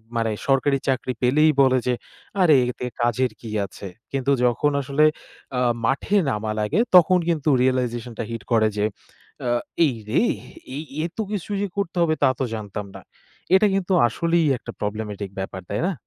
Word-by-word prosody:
মানে 115 -1 +1 0.2
সরকারি 135 +1 +3
চাকরি 130 -1 0
পেলেই 150 +5 +4
বলে 130 -1 +4
যে, 125 - +3 0.5
"আরে 160 -5 +6
এতে 125 0 -5 0.2
কাজের 120 +1 +1
কি 115 - -8 0.2
আছে।" 100 +1 -9 0.2
কিন্তু 135 0 0
যখন 135 +5 +2
আসলে 140 +3 +1 0.5
আ - - +1 0.2
মাঠে 140 - +1
নামা 110 -3 -2
লাগে 105 - 0 0.2
তখন 180 +1 +7
কিন্তু 155 -3 +1
রিয়ালাইজেশন 125 -2 0
টা - - 0
হিট 115 -3 -5
করে 110 -2 +4
যে, 105 - +2 0.6
আ - - +1 0.4
"এইরে 115 -3 -1 0.5
এই 150 - -4 0.2
এত 170 - -8
কিছু 205 -1 -4
যে 205 - 0
করতে 185 -3 -2
হবে 160 -2 +3
তা 135 - +6
তো - - +1
জানতাম 105 -1 -5
না।" - - -9 0.5
এটা 210 +2 +5
কিন্তু 195 -1 0
আসলেই 165 +7 +1
একটা 120 - -9
প্রবলেমেটিক 105 -1 -4
ব্যাপার, 95 0 -5
তাই 100 - -1
না? 195 - 0
130 Hz, 170 wpm, -23 LUFS, 110-155 Hz, 0.6 s, তখন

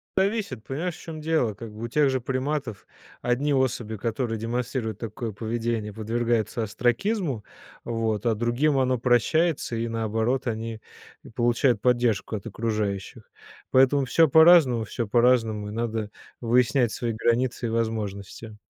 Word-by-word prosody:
Зависит, 195 - 0
понимаешь 160 +6 -3
в - - -14
чём 160 -2 -8
дело. 155 -8 +1
Как 110 +2 -9
бы 105 +2 -9
у - - -2
тех 145 +4 +2
же 130 0 0
приматов 130 -2 -3 0.3
одни 130 +4 +1
особи, 120 -5 0
которые 115 +1 -2
демонстрируют 115 0 -3
такое 115 +1 -5
поведение, 115 0 -3
подвергаются 115 +1 -1
остракизму, 125 - -1 0.4
вот, 115 -2 -2
а 115 - +3
другим 120 +6 +1
оно 130 -1 +2
прощается 130 +4 +1
и, 115 +1 -2
наоборот, 115 +3 -1
они 110 -1 -4 0.5
получают 120 -1 +2
поддержку 120 -4 +1
от 105 +1 -6
окружающих. 105 -3 -3 0.4
Поэтому 135 +1 +4
всё 160 +6 +4
по-разному, 160 -7 +6
всё 115 +2 -4
по-разному, 115 -2 +2
и - - -7
надо 110 -1 -3 0.3
выяснять 120 0 +2
свои 120 +1 -2
границы 120 +2 0
и - - -3
возможности. 110 -1 -4
120 Hz, 140 wpm, -25 LUFS, 110-130 Hz, 0.5 s, по-разному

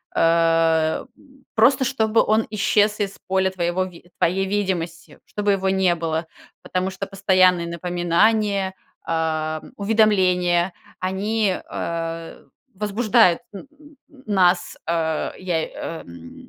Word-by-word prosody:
а, 165 -1 +2
м, 270 -2 -23
просто 250 +4 +4
чтобы 225 -3 +2
он 215 +1 +1
исчез 210 0 +2
из 200 -1 -3
поля 190 0 +1
твоего 175 0 -1
ви 175 -1 -14
твоей 190 +3 +1
видимости, 185 -5 -3
чтобы 205 -1 -1
его 190 -1 +1
не 190 -2 +2
было. 165 0 -2 0.4
Потому 185 +1 -2
что 190 +1 -5
постоянные 185 -3 +3
напоминания, 185 +4 +1 0.3
а, 155 -1 -1
м, - - -14
уведомления- 185 -4 +2 0.3
они, 195 +2 0
а, 165 0 -5 0.3
возбуждают 210 -1 +2
н 200 - -9
н 300 0 -19 0.3
нас, 180 -4 +2
а, 160 -2 -1
я, 175 -3 -1
э, 165 +1 -6
м, 85 -1 -13
185 Hz, 120 wpm, -22 LUFS, 170-205 Hz, 0.4 s, просто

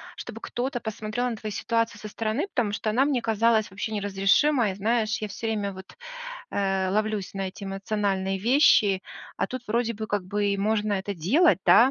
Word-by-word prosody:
чтобы - - -8
кто-то 245 +1 -3
посмотрел 220 +2 -3
на 235 - -3
твою 215 0 -6
ситуацию 230 +2 -1
со 215 - -7
стороны, 225 - -2
потому 240 - -1
что 215 +1 -2
она 245 +5 +3
мне 275 -4 +1
казалась 225 -1 +2
вообще 205 +3 -5
неразрешимой. 205 +4 +2
Знаешь, 220 +1 +1
я 215 - -4
всё 210 +3 -5
время 205 -3 -1
вот, 190 - -12 0.5
э, 195 -1 0
ловлюсь 215 -1 -1
на 195 -1 -3
эти 195 +2 -9
эмоциональные 195 -1 -1
вещи, 215 -4 +4 0.4
а - - +1
тут 255 -1 -6
вроде 230 +1 0
бы, 220 +1 -5
как 205 -3 -1
бы, 205 +2 0
и 200 0 0
можно 210 +1 +1
это 200 +1 -3
делать, 250 - +4
да, 250 +3 +7
215 Hz, 185 wpm, -26 LUFS, 200-230 Hz, 0.5 s, да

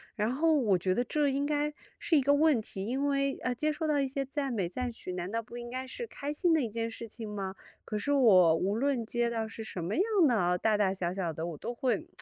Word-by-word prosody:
然 215 +1 0
后 320 +3 +3
我 220 -10 +3
觉 185 +1 0
得 245 - +1
这 295 +3 +1
应 275 +1 0
该 295 0 0 0.3
是 330 - +1
一 - - +4
个 285 +2 +3
问 295 -3 +4
题， 195 -2 -7
因 265 +5 -1
为， 275 -1 +1
呃， 250 - 0
接 305 +5 0
收 315 +1 -3
到 295 -2 +2
一 275 - +1
些 275 +1 -2
赞 275 0 -3
美、 200 -7 -1
赞 250 +6 -3
许， 185 -5 -7
难 180 0 -4
道 230 - -1
不 230 - -12
应 240 0 -7
该 255 +1 -4
是 470 - -6
开 290 -7 -5
心 345 +3 +2
的 315 - +3
一 235 - -2
件 230 +1 -2
事 230 0 -8
情 220 0 -7
吗？ 195 -2 -4 0.3
可 215 - -3
是 210 +7 -1
我 190 - +6
无 190 +5 0
论 255 -1 0
接 240 +1 0
到 225 -1 -2
是 225 0 -8
什 185 -5 -6
么 180 +5 -2
样 370 - +3 0.2
的 250 - +3
哦， 180 -3 +2
大 215 +4 +2
大 200 -2 +2
小 180 -2 -2
小 185 -4 -2
的， 160 +1 -4
我 165 -3 -6
都 240 - -5
会 245 +1 -1
240 Hz, 295 characters per minute, -30 LUFS, 205-280 Hz, 0.3 s, 我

